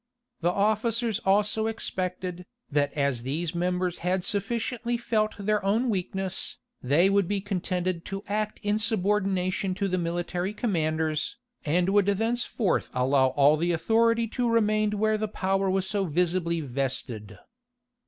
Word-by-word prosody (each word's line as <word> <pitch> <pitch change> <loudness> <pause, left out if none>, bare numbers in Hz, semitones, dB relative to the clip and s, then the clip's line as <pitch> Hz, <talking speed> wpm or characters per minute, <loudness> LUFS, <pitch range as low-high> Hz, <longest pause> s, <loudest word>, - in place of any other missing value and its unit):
The 175 - +1
officers 220 +3 +1
also 210 +3 +2
expected, 185 -4 -3 0.2
that 145 0 +1
as 140 -5 0
these 155 +7 -2
members 180 0 -1
had 180 +1 0
sufficiently 230 +4 -1
felt 215 -2 0
their 210 0 0
own 225 +5 +2
weakness, 190 -1 -2 0.2
they 145 +8 +4
would 200 -2 +2
be 205 +1 0
contented 185 -3 -2
to 195 0 -5
act 215 +1 -2
in 205 +1 +1
subordination 195 -3 0
to 200 0 -1
the 185 -1 0
military 175 +3 -2
commanders, 160 -7 -1 0.3
and 175 +4 +2
would 200 0 +3
thenceforth 225 +1 0
allow 130 +1 +3
all 145 +3 +4
the 170 +2 +1
authority 230 +6 +2
to 240 +1 0
remain 215 -2 +2
where 215 +1 +1
the 215 - -1
power 195 -1 0
was 190 0 +1
so 200 0 +1
visibly 170 0 0
vested. 125 -6 -3
190 Hz, 140 wpm, -27 LUFS, 170-215 Hz, 0.3 s, they